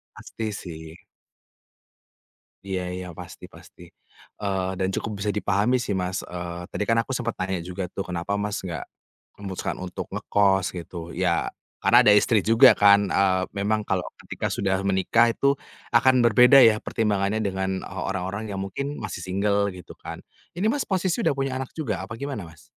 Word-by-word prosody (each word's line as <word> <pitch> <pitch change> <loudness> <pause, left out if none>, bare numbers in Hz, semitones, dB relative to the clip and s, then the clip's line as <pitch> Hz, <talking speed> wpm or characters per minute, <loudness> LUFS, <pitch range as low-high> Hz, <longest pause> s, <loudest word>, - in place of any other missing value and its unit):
Pasti 110 -1 -6
sih. 80 -4 -8 1.7
Iya 95 -2 -2
iya 90 0 -6
pasti - - -11
pasti. - - -15 0.6
Eee, 95 -2 -1
dan 95 - +1
cukup 105 -2 -4
bisa 105 - -2
dipahami 105 +5 +2
sih 120 -4 -2
Mas, 90 -1 -2
eee, 85 0 -6
tadi - - -1
kan 115 - +3
aku 135 - -6
sempat 125 -2 -2
nanya 95 -1 -1
juga 90 +2 -5
tuh 95 - -4
kenapa 90 +2 -3
Mas 105 0 -2
nggak 85 -4 -4 0.5
memutuskan 95 -2 -4
untuk 90 -1 -5
ngekos 95 -2 +2
gitu, 85 -1 -7
ya - - 0 0.3
karena - - +6
ada 105 - +7
istri 110 +1 +4
juga 115 +5 +7
kan, 100 -1 +5
eee, 95 -1 +3 0.2
memang 105 +2 +1
kalau 95 -2 0 0.2
ketika - - -4
sudah 95 -1 0
menikah 115 +5 +3
itu 140 0 +3 0.4
akan 130 -2 +5
berbeda 125 +4 +7
ya 110 -1 +5
pertimbangannya 105 -1 0
dengan 95 -1 -2
e - - -9 0.2
orang-orang 95 +3 -4
yang 100 - -4
mungkin 140 +9 -4
masih 95 -4 -5
single 100 +2 +1
gitu 90 - -11
kan. - - -7 0.4
Ini 180 - -2
Mas 290 - -2
posisi 185 +1 0
udah - - +2
punya 135 -1 -2
anak 130 - -4
juga 115 - -2
apa 110 +3 -8
gimana 115 -9 -5
Mas? 80 - -17
100 Hz, 170 wpm, -25 LUFS, 95-115 Hz, 1.7 s, ada